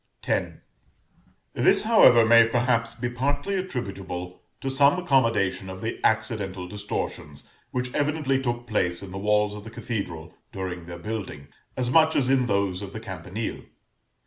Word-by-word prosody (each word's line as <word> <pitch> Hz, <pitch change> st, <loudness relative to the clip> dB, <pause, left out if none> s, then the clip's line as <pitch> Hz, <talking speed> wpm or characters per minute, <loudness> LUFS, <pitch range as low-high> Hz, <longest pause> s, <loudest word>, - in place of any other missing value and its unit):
X. -, -, 0 dB, 1.0 s
This, -, -, +3 dB
however, 170 Hz, -, +6 dB
may 115 Hz, 0 st, +7 dB
perhaps 115 Hz, -1 st, +1 dB
be 120 Hz, +1 st, -3 dB
partly 140 Hz, +9 st, -1 dB
attributable 100 Hz, -, -5 dB, 0.2 s
to 135 Hz, -, -3 dB
some 140 Hz, +4 st, +4 dB
accommodation 115 Hz, -, +1 dB
of 95 Hz, 0 st, -8 dB
the 110 Hz, -, -4 dB
accidental 105 Hz, -5 st, 0 dB
distortions 100 Hz, +2 st, -5 dB, 0.2 s
which 125 Hz, 0 st, -3 dB
evidently 145 Hz, -2 st, 0 dB
took 120 Hz, -2 st, -2 dB
place 90 Hz, -6 st, -1 dB
in 95 Hz, -, -9 dB
the 95 Hz, -, -5 dB
walls 105 Hz, 0 st, +2 dB
of 105 Hz, -1 st, -8 dB
the 110 Hz, -, -9 dB
cathedral 95 Hz, -8 st, -5 dB, 0.2 s
during 90 Hz, -3 st, -5 dB
their 85 Hz, 0 st, -8 dB
building, 95 Hz, -8 st, -6 dB, 0.3 s
as 125 Hz, -1 st, 0 dB
much 160 Hz, +2 st, +5 dB
as 130 Hz, -2 st, +2 dB
in 130 Hz, -2 st, +3 dB
those 100 Hz, -3 st, 0 dB
of 100 Hz, -1 st, -7 dB
the 110 Hz, -, -5 dB
campanile. 95 Hz, 0 st, -5 dB
110 Hz, 150 wpm, -25 LUFS, 95-125 Hz, 1.0 s, may